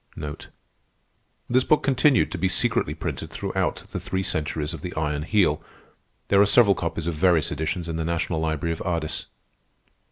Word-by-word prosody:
This 125 +1 +3
book 155 - +3
continued 135 -1 +3
to - - -4
be 95 - +2
secretly 95 -3 +1
printed 80 - -5
throughout - - -2
the - - -3
three 95 0 -2
centuries 75 -2 -2
of - - -7
the 90 -1 -6
Iron 75 -2 -1
Heel. 100 +5 +2 0.7
There 100 0 +5
are - - +7
several 105 -1 +6
copies 85 -2 -3
of 85 - -1
various 80 0 +2
editions 80 +4 -2
in 80 -1 -3
the 80 - -1
National 85 0 -1
Library 80 +1 -1
of 80 - -8
Ardis. 85 -4 -2
85 Hz, 165 wpm, -24 LUFS, 80-100 Hz, 0.7 s, are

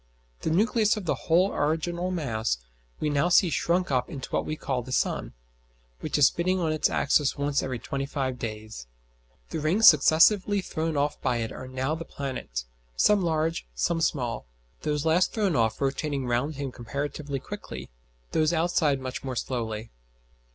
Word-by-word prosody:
The - - -2
nucleus 215 +5 +3
of 205 - -5
the - - +2 0.2
whole 180 +4 +4
original 170 +4 -1
mass 115 - -1 0.4
we - - -1
now 145 +4 +2
see 180 -1 +5
shrunk 170 +5 +1
up 125 -1 +1
into 140 -6 -7
what - - -1
we 155 - -2
call 130 -4 -2
the 130 +2 -9
sun, - - -1 0.7
which - - -2
is - - +6
spinning 185 +2 +2
on 165 -3 0
its 155 - +2
axis 140 0 +2
once 140 0 +1
every 130 -2 -3
twenty 135 +4 -4
five 130 -3 -2
days. 110 - -6 0.6
The - - -2
rings 175 +9 +4
successively 185 +7 +6
thrown 160 -4 -2
off 145 +1 0
by 125 -2 +1
it 115 -1 -3
are 130 - -8
now 130 +3 -2
the 165 +1 -4
planets 130 - -5 0.3
some 205 - +4
large, 160 - 0
some 165 - 0
small 125 - -1 0.3
those 150 0 -1
last 165 +3 +2
thrown 200 -7 +1
off 115 -2 +1
rotating 140 0 -1
round 125 +5 0
him 140 -1 -4
comparatively 140 +3 -4
quickly, 130 - -8 0.4
those 155 0 +2
outside 160 -4 +2
much 130 0 -5
more 130 -2 -4
slowly. 115 -3 -3
145 Hz, 170 wpm, -27 LUFS, 130-165 Hz, 0.7 s, is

